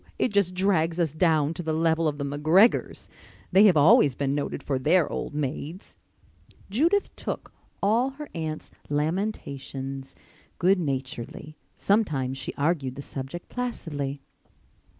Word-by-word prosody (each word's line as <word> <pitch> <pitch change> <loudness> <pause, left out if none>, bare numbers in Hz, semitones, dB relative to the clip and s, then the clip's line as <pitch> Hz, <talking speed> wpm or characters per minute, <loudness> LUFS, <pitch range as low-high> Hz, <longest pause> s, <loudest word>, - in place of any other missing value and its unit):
It - - +1
just 190 -3 +2
drags 180 -3 +1
us 160 -4 +1
down 155 -2 +2
to 165 - -5
the 160 -2 -2
level 160 0 +2
of 145 -1 -1
the 140 - -3
McGregors. 155 +10 +3 0.4
They 200 +3 +7
have 185 -6 +6
always 150 - +6
been 140 -1 -1
noted 145 0 -3
for 135 -2 -1
their 170 +5 +3
old 145 - -5
maids." 150 - -4 0.8
Judith 335 - +2
took - - -5 0.3
all 230 +6 +3
her 290 +2 -9
aunt's 155 -1 -5 0.2
lamentations 140 -5 -3 0.4
good 190 +1 +3
naturedly. 135 0 -4 0.2
Sometimes 145 - 0
she 130 - -4
argued 140 -3 0
the 140 - -7
subject 135 +7 -7
placidly. 145 - -4
155 Hz, 135 wpm, -26 LUFS, 140-190 Hz, 0.8 s, They